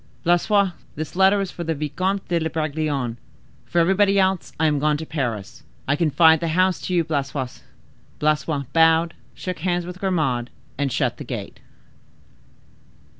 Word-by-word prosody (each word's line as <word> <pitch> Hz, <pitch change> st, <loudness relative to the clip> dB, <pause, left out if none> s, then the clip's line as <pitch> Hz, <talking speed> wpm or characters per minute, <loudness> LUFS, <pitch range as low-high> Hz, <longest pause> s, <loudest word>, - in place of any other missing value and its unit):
"Blaisois, 190 Hz, +3 st, +3 dB, 0.2 s
this 155 Hz, +2 st, -5 dB
letter 195 Hz, +1 st, +4 dB
for 180 Hz, -2 st, -7 dB
the 165 Hz, -1 st, -1 dB
Vicomte 185 Hz, +7 st, -2 dB
de 165 Hz, -2 st, 0 dB
Bragelonne. 150 Hz, -6 st, -2 dB, 0.5 s
For -, -, -4 dB
everybody 195 Hz, +4 st, +4 dB
else 190 Hz, -2 st, +1 dB
I 160 Hz, -, +3 dB
am 150 Hz, -2 st, +2 dB
gone 150 Hz, +1 st, +2 dB
to 160 Hz, -, -6 dB
Paris. 120 Hz, -11 st, -4 dB, 0.3 s
I 145 Hz, -, +3 dB
confide 160 Hz, 0 st, +5 dB
the 170 Hz, -, -2 dB
house 185 Hz, +3 st, +2 dB
to 185 Hz, -, -3 dB
you, 170 Hz, -, +3 dB
Blaisois." 140 Hz, -4 st, -3 dB, 0.6 s
Blaisois 150 Hz, -1 st, 0 dB
bowed, 165 Hz, +1 st, +4 dB, 0.2 s
shook 180 Hz, -3 st, -5 dB
hands 175 Hz, +1 st, -1 dB
with 180 Hz, +1 st, -8 dB
Grimaud, 135 Hz, -11 st, 0 dB, 0.3 s
and 140 Hz, -1 st, -1 dB
shut -, -, 0 dB
the -, -, -7 dB
gate. -, -, -6 dB
160 Hz, 150 wpm, -22 LUFS, 150-180 Hz, 0.6 s, confide